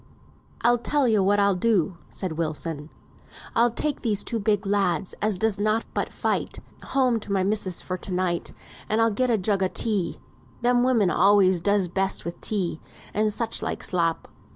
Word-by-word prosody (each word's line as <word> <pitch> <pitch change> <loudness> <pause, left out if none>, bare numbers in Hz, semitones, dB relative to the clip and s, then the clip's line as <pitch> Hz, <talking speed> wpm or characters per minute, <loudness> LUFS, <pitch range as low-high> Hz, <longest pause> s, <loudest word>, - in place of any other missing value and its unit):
"I'll 240 +1 +3
tell 285 +2 +1
yo 215 -3 +3
what 200 +2 +3
I'll 200 0 +4
do," 185 -3 +1
said 185 -3 -5
Wilson. 155 -1 -3 0.7
"I'll 235 +1 +4
take 285 +5 -2
these 210 -4 0
two 230 - -3
big 205 -1 0
lads, 195 -4 0
as 210 -2 +1
does 210 0 0
nought 215 +2 +1
but - - -2
fight, - - -2 0.2
home 255 -4 +1
to 205 - -8
my 195 -1 +2
missis's 195 -2 0
for 185 0 -4
to 195 - -5
night, 180 -1 -1 0.4
and 215 - +1
I'll 225 0 +3
get 255 +5 0
a 230 - +3
jug 195 0 0
o' 190 - +3
tea. 205 -6 -1 0.4
Them 245 0 +3
women 235 -7 +3
always 195 -3 +4
does 200 0 +2
best 190 +2 -1
with 170 - -6
tea 185 -6 -1 0.3
and 215 0 +1
such 225 +2 -1
like - - -3
slop." 170 -3 -1
205 Hz, 180 wpm, -25 LUFS, 185-225 Hz, 0.7 s, I'll